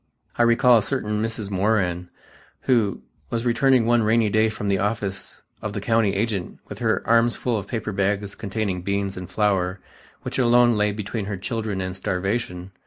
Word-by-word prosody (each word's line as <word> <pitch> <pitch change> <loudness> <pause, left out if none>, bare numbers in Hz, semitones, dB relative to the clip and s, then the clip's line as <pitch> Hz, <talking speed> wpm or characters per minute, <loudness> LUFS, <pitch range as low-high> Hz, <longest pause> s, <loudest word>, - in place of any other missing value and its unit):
I - - 0
recall 120 0 +5
a - - -1
certain 105 -3 -2
Mrs. 110 -2 -3
Moran, 95 -3 0 0.5
who 115 -6 +1 0.3
was 115 0 -2
returning 125 0 +3
one 120 0 +3
rainy 110 -1 +2
day 110 +1 +3
from 105 -1 -5
the 100 -1 +1
office 100 -2 -3 0.2
of - - -4
the - - -3
county 115 -3 +1
agent 100 -3 -2
with - - -8
her - - 0
arms 115 +1 +4
full 125 -2 -1
of 100 -3 -4
paper 110 -2 -3
bags 100 0 -1
containing 100 -3 -3
beans 100 +1 -2
and 90 -1 -7
flour 95 -2 0 0.4
which - - -3
alone 120 -1 +5
lay 105 0 +2
between 105 +1 -4
her 100 -1 -4
children 105 0 -3
and 95 0 -4
starvation. 95 -1 -3
105 Hz, 175 wpm, -23 LUFS, 95-115 Hz, 0.5 s, recall